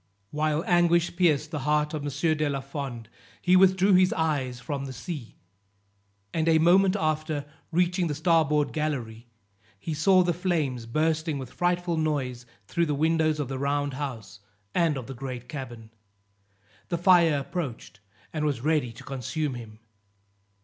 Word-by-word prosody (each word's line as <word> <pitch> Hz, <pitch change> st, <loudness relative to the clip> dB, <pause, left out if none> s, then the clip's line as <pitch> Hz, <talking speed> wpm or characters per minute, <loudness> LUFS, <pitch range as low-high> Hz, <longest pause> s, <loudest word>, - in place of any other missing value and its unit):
While 155 Hz, +1 st, 0 dB
anguish 175 Hz, -1 st, +3 dB
pierced 155 Hz, -4 st, +2 dB
the 150 Hz, -, -3 dB
heart 150 Hz, +2 st, +1 dB
of 155 Hz, -, -3 dB
M. 145 Hz, +3 st, 0 dB
de 150 Hz, -1 st, 0 dB
la 140 Hz, -1 st, -1 dB
Fond, 135 Hz, -4 st, -6 dB, 0.3 s
he 180 Hz, +1 st, +3 dB
withdrew 190 Hz, +1 st, +5 dB
his 185 Hz, 0 st, +5 dB
eyes 140 Hz, -6 st, -1 dB
from 140 Hz, 0 st, -4 dB
the 135 Hz, -, -6 dB
sea; 140 Hz, -2 st, -7 dB, 1.0 s
and 160 Hz, 0 st, +1 dB
a 160 Hz, -, +5 dB
moment 185 Hz, +4 st, +4 dB
after, 155 Hz, -4 st, -1 dB, 0.3 s
reaching 175 Hz, +1 st, +1 dB
the 150 Hz, -, -2 dB
starboard 150 Hz, -2 st, +2 dB
gallery, 125 Hz, -7 st, -3 dB, 0.5 s
he 160 Hz, -, -4 dB
saw 185 Hz, +5 st, +4 dB
the 175 Hz, -1 st, +1 dB
flames 155 Hz, -9 st, -1 dB
bursting 155 Hz, +3 st, 0 dB
with 130 Hz, -2 st, -8 dB
frightful 175 Hz, -1 st, 0 dB
noise 130 Hz, -6 st, -2 dB, 0.2 s
through 170 Hz, +10 st, 0 dB
the 150 Hz, -, 0 dB
windows 155 Hz, 0 st, +2 dB
of 145 Hz, -, -2 dB
the 135 Hz, 0 st, -4 dB
round 140 Hz, 0 st, 0 dB
house 115 Hz, -8 st, -6 dB, 0.3 s
and 165 Hz, -4 st, +2 dB
of 130 Hz, -, -5 dB
the 135 Hz, -, -7 dB
great 125 Hz, -1 st, -7 dB
cabin. 120 Hz, -6 st, -8 dB, 1.0 s
The 170 Hz, -, 0 dB
fire 170 Hz, -3 st, +5 dB
approached, 140 Hz, -, -5 dB, 0.3 s
and 155 Hz, -1 st, -2 dB
was 145 Hz, -5 st, -1 dB
ready 150 Hz, -4 st, +1 dB
to 115 Hz, -, -12 dB
consume 135 Hz, +2 st, -3 dB
him. 115 Hz, -3 st, -9 dB
150 Hz, 155 wpm, -27 LUFS, 135-165 Hz, 1.0 s, withdrew